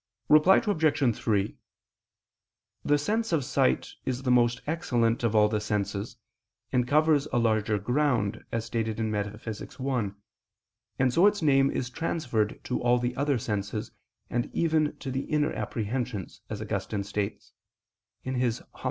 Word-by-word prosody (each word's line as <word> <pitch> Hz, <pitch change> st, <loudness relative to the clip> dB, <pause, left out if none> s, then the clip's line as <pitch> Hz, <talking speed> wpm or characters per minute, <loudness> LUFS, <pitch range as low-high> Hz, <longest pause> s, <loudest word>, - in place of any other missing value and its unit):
Reply 155 Hz, +6 st, +7 dB
Obj. 155 Hz, -, +2 dB
3: 105 Hz, -3 st, 0 dB, 1.3 s
The 145 Hz, 0 st, +3 dB
sense 220 Hz, +9 st, -1 dB
of 155 Hz, -6 st, +1 dB
sight 65 Hz, -, +1 dB
is 130 Hz, 0 st, -3 dB
the 125 Hz, -, +1 dB
most 120 Hz, 0 st, +3 dB
excellent 120 Hz, -8 st, 0 dB
of 115 Hz, -2 st, +1 dB
all 105 Hz, 0 st, +6 dB
the 105 Hz, 0 st, -1 dB
senses, 105 Hz, +1 st, -2 dB, 0.5 s
and 125 Hz, -2 st, +1 dB
covers 150 Hz, +1 st, +3 dB
a 120 Hz, -, +1 dB
larger 110 Hz, -2 st, +2 dB
ground, 120 Hz, -1 st, 0 dB
as 115 Hz, -1 st, -2 dB
stated 115 Hz, -1 st, -2 dB
in 110 Hz, -1 st, -1 dB
Metaph. 105 Hz, +1 st, -3 dB
i: 120 Hz, 0 st, -3 dB, 0.9 s
and 130 Hz, -1 st, +2 dB
so 175 Hz, +8 st, +6 dB
its 205 Hz, -4 st, +1 dB
name 135 Hz, -2 st, +4 dB
is 125 Hz, -2 st, -3 dB
transferred 125 Hz, -9 st, -1 dB
to 125 Hz, -, -2 dB
all 120 Hz, 0 st, +4 dB
the 125 Hz, 0 st, -2 dB
other 140 Hz, -1 st, +1 dB
senses, 105 Hz, -2 st, -3 dB, 0.4 s
and 120 Hz, 0 st, -2 dB
even 155 Hz, -2 st, +1 dB
to 135 Hz, -, -5 dB
the 135 Hz, +1 st, -2 dB
inner 150 Hz, +1 st, 0 dB
apprehensions, 115 Hz, -3 st, -3 dB
as -, -, -4 dB
Augustine 100 Hz, -1 st, -3 dB
states 100 Hz, +1 st, -4 dB, 0.7 s
(De 130 Hz, -, -3 dB
Verb. 125 Hz, -2 st, -1 dB
Dom. -, -, -18 dB
125 Hz, 150 wpm, -28 LUFS, 110-145 Hz, 1.3 s, Reply